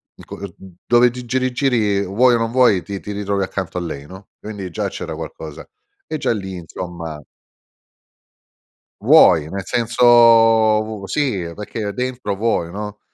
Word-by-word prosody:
il - - -15
co - - -9
mhmm, 95 -2 -11
dove 120 +1 +4
ti 125 0 -9
giri 130 +1 -1
giri, 115 -7 +1
vuoi 120 +6 +3
o - - +2
non 115 0 -2
vuoi, 120 -8 +4
ti 100 -1 -6
ti 105 - -7
ritrovi 100 -1 -2
accanto 95 -2 -5
a - - -2
lei, 70 -4 -6
no, 95 +1 -13
quindi 100 -3 -7
già 80 - -3
c'era - - -6
qualcosa 75 -2 -9 0.4
e 155 - -3
già - - -1
lì, 95 -4 -4
insomma. 85 -2 -7 1.8
Vuoi, 80 -2 +5
nel 95 +1 -5
senso 120 +1 -1
vu 110 -3 +5
sì, 100 - -2
perché 105 0 -5
dentro 125 -5 -3
vuoi, 95 -6 -1
no. 105 +1 -7
105 Hz, 160 wpm, -19 LUFS, 95-120 Hz, 1.8 s, Vuoi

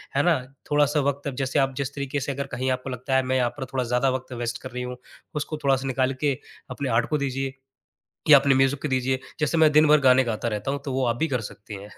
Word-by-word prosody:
है 140 - +3
ना? 175 -2 +4 0.4
थोड़ा-सा 145 0 +3
वक़्त 140 +1 -1
अब 140 - -4
जैसे 135 +2 0
आप 135 -1 +1
जिस 140 -1 -3
तरीके 140 0 -2
से 140 +1 -3
अगर 140 +1 -4
कहीं 130 +1 -2
आपको 130 +1 -3
लगता 130 +1 -2
है 130 - +4
मैं 130 0 -1
यहाँ 120 -1 +2
पर 135 - -4
थोड़ा 130 -1 +1
ज़्यादा 125 +2 +1
वक़्त 130 0 -4
वेस्ट 120 -1 -4
कर - - -8
रही 125 +1 -4
हूँ, 125 0 -6 0.4
उसको 150 +1 -3
थोड़ा-सा 135 -1 +2
निकाल 130 0 +1
के 140 -3 +1 0.3
अपने 140 -2 -3
आर्ट 115 0 +1
को 150 - +1
दीजिए 135 -1 -2 0.8
या 145 -2 +10
अपने 135 0 +3
म्यूजिक 135 +1 +2
को 150 - -1
दीजिए। 130 0 0 0.2
जैसे 150 +2 +1
मैं 160 -1 +6
दिन 150 +1 +5
भर 150 0 +6
गाने 130 -1 +5
गाता 115 -1 -2
रहता 110 +3 -2
हूँ, 140 - -2
तो 135 - -3
वो 130 0 +1
आप 120 -1 +1
भी 160 - +1
कर 130 -5 -1
सकती 105 0 -9
हैं। 105 - -11
135 Hz, 265 wpm, -25 LUFS, 125-140 Hz, 0.8 s, या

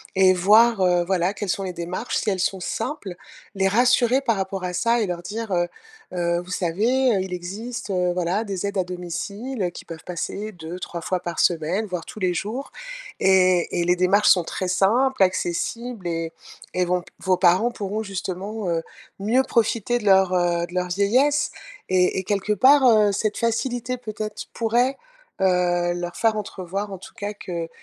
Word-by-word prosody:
et 185 -1 +6
voir, 210 +4 +5
heu, 180 -1 +3
voilà, 185 +1 +1
quelles 205 -2 -5
sont 195 +3 -1
les 185 -1 -4
démarches 180 +7 -3
si 220 - 0
elles 190 -2 -1
sont 190 +1 0
simples, 225 - -4 0.4
les 195 0 +2
rassurer 245 +3 +3
par 230 -6 +1
rapport 190 0 -3
à 180 - -3
ça 235 +5 +2
et - - +1
leur 175 -1 -3
dire, 220 +2 -5
heu: 175 -1 +1 0.5
«Heu, 170 -1 0
vous 180 - -13
savez, 225 +9 +1
heu, 190 - 0
il 185 -1 -5
existe, 210 +6 -6
heu, 180 -1 +1
voilà, 180 +4 0
des 195 -3 -4
aides 200 0 -4
à 185 - +2
domicile, 200 +7 -5
heu, 180 - +1
qui - - -10
peuvent 165 -1 -9
passer 195 +4 -4
2-3 170 0 -7
fois 185 +2 -1
par 175 -1 -5
semaine, 175 +5 +1
voire 180 -3 -4
tous 215 - -10
les 180 -2 +1
jours, 225 +10 -4 0.5
et 185 -2 +3
et - - 0
les 180 0 +3
démarches 195 +3 +4
sont 180 -3 +5
très 185 - -3
simples, 220 +7 +2
accessibles, 190 +4 -2
et 165 -1 -3 0.4
et 180 - +1
vont 180 +1 0
p - - -19
vos 185 -1 +1
parents 185 +6 +4
pourront, 210 -1 -3
justement, 195 +1 -4
heu, 165 -1 0 0.4
mieux 235 +6 +2
profiter 235 0 +1
de 210 - -8
leur, 190 -2 +5
heu, 175 -1 +1
de 175 - -14
leur 180 0 0
vieillesse» 255 - +2 0.4
et 185 0 +2
et - - -4
quelque 205 +2 0
part, 265 +7 +6
heu, 215 -3 +5
cette 210 +1 -1
facilité 245 +2 -1
peut-être 215 -2 -6
pourrait, 240 +4 +1 0.4
heu, 175 -2 +2
leur 175 0 -5
faire 225 -1 +2
entrevoir 195 0 -4
en - - -5
tout - - -12
cas 205 +1 -4
que 170 -4 -5
190 Hz, 190 wpm, -23 LUFS, 180-220 Hz, 0.5 s, et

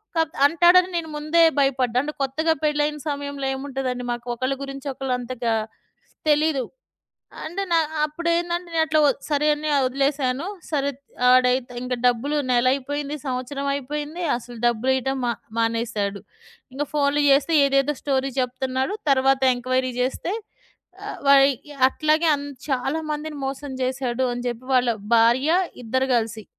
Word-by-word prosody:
కాపోతే 320 -1 0
అంటాడని 350 +4 +5
నేను 320 -2 -4
ముందే 305 +3 +2 0.2
భయపడ్డా. 255 -3 +1
అంటే 300 - -4
కొత్తగా 315 +4 +1
పెళ్లయిన 300 0 0
సమయంలో 285 -1 -4
ఏముంటదండి. 265 -2 -4
మాకు 240 0 -5
ఒకళ్ళ 255 +3 -1
గురించి 275 0 -7
ఒకళ్ళు 265 -1 -3
అంతగా 245 -2 -2 0.8
తెలీదు. 300 -2 +2 0.8
అంటే 350 +5 -4
న 340 - +3 0.3
అప్పుడేందంటే 345 +3 -1
నేనట్లా 315 -1 +3
ఒద్ 275 - 0
సరే. 295 +1 +1
అని 305 +1 -4 0.2
ఒదిలేసాను 275 +2 0 0.2
సరే. 280 -2 0
త్ 280 - -42 0.3
ఆడైతే 250 0 +3
ఇంక 250 0 -2
డబ్బులు 255 +5 +1 0.2
నెలయిపోయింది. 275 +4 0
సంవత్సరం 260 +2 -3
అయిపోయింది. 295 +5 -4
అసలు 240 0 -10
డబ్బులియ్యటం 260 +3 +1
మ - - +1 0.3
మానేసాడు. 225 -3 -1 0.5
ఇంక 290 +2 -1
ఫోన్లు 290 0 +2
జేస్తే 280 +4 +3
ఏదేదో 275 +1 +2
స్టోరీ 270 -1 0
చెప్తున్నాడు. 260 +5 -2 0.2
తరువాత 270 0 +3 0.2
ఎంక్వైరీ 255 +1 -1
జేస్తే 260 +8 -1 0.7
ఆహ్, - - -6
వయ్ 275 0 +7 0.4
అట్లాగే 310 +4 +1
అన్ 285 0 -4 0.2
చాలా 270 +4 0
మందిని 300 0 -4
మోసం 275 +1 -5
జేసాడు 255 -1 -1
అని 245 0 -4
జెప్పి 240 +1 -6
వాళ్ళ 245 -1 +3 0.3
భార్య 240 +6 +4 0.3
ఇద్దరు 260 +3 0
గలిసి. 225 -1 -2
275 Hz, 135 wpm, -23 LUFS, 255-295 Hz, 0.8 s, వయ్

